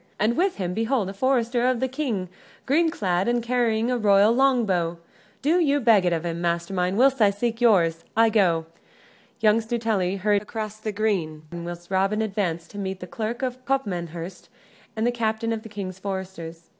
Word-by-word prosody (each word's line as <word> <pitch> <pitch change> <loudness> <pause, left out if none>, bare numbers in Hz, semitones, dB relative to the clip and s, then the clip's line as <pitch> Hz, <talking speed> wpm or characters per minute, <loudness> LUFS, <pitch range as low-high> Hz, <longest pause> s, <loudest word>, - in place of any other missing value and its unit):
And 220 +3 +2
with 370 +3 +1
him 180 -2 -3
behold 225 -1 0
a - - -6
forester 245 +1 +1
of 255 -2 +1
the 260 - 0
King 255 -9 -2 0.4
green 325 +5 +3
clad 190 - 0
and 240 0 +1
carrying 235 -1 +1
a 250 - 0
royal 205 0 +5
longbow. 215 -11 +2 0.5
Do 325 +5 +3
you 290 -4 +2
beg 220 -7 +4
it 175 - +2
of 170 0 -1
him, 170 0 -3
master 170 +1 -1
mine, 180 +1 0
whilst 265 0 +4
I 210 - +7
seek 230 +4 -2
yours. 170 -8 +3
I 225 0 +6
go." 180 -7 +2 0.8
Young 215 +1 +4
Stuteley 220 -5 -1
hurried 205 +1 +2
across 215 0 -6
the 215 0 -3
green, 190 -8 -1
whilst 175 +1 -7
Robin 195 +3 +1
advanced 185 -6 -2
to 205 - -8
meet 190 -1 -4
the 180 - -7
Clerk 225 +7 -4
of 255 0 -3
Copmanhurst 180 -9 -3 0.5
and 220 +1 -1
the 240 - +3
captain 230 -1 -1
of 220 - -4
the 220 - -11
King's 190 -3 -6
Foresters. 190 -4 -6
215 Hz, 185 wpm, -24 LUFS, 185-235 Hz, 0.8 s, I